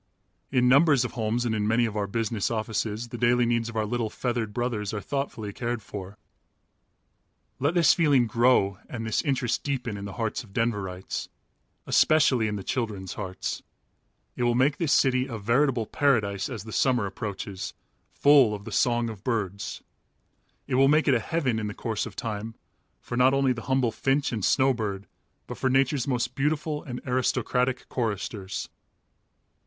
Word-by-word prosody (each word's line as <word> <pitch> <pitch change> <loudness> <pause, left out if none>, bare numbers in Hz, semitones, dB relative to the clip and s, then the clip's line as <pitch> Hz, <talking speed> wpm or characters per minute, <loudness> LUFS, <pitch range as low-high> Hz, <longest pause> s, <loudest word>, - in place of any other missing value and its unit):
In 125 -2 +3
numbers 140 -1 +5
of - - -4
homes 115 0 -1
and 115 - 0
in 105 -1 0
many 115 +2 +3
of 110 -2 -4
our 105 -1 -1
business 110 0 -1
offices 110 0 -2
the 120 -1 -7
daily 120 0 +3
needs 115 -1 0
of 115 - -9
our 110 -1 0
little 115 0 -1
feathered 120 -2 -2
brothers 110 -3 -2
are - - -2
thoughtfully 115 -5 -4
cared 120 -1 -3
for. 100 0 -8 1.4
Let 145 +6 +1
this 170 -4 +6
feeling 145 -7 +3
grow 115 -4 +3
and 115 -2 -5
this 110 - 0
interest 130 -5 0
deepen 125 -7 -2
in 100 - -6
the 100 - -6
hearts 115 -1 -2
of 100 -4 -18
Denverites, 100 -6 -2 0.6
especially 135 -7 +4
in 105 - -2
the 100 - -5
children's 100 -7 -3
hearts. 95 -3 -4 0.7
It - - -5
will 120 -1 +2
make 135 +4 +3
this 165 -5 0
city 130 -1 +3
a 115 -4 -5
veritable 120 +3 +1
paradise 105 -8 +1
as 115 -6 -6
the 110 0 -9
summer 125 -5 +2
approaches, 100 -1 -5 0.4
"full 140 -7 +5
of 100 0 -10
the - - -7
song 120 -1 +2
of 110 -3 -8
birds." 105 -5 -3 0.8
It 135 - -5
will 135 - +6
make 155 +3 +3
of 140 - +5
it - - +4
a - - -4
heaven 130 -4 -1
in 105 - -3
the 105 - -6
course 110 -3 -2
of - - -11
time, 110 0 -4 0.4
for - - -6
not 130 +2 +4
only 135 -2 +3
the 120 - -7
humble 130 -3 +2
finch 135 +4 0
and 110 -5 -3
snowbird, 110 -8 +1 0.4
but - - -8
for 130 - +1
nature's 135 0 +2
most 125 -3 -1
beautiful 150 +1 -1
and 125 -2 -6
aristocratic 125 0 0
choristers. 105 -4 -3
120 Hz, 175 wpm, -26 LUFS, 105-130 Hz, 1.4 s, this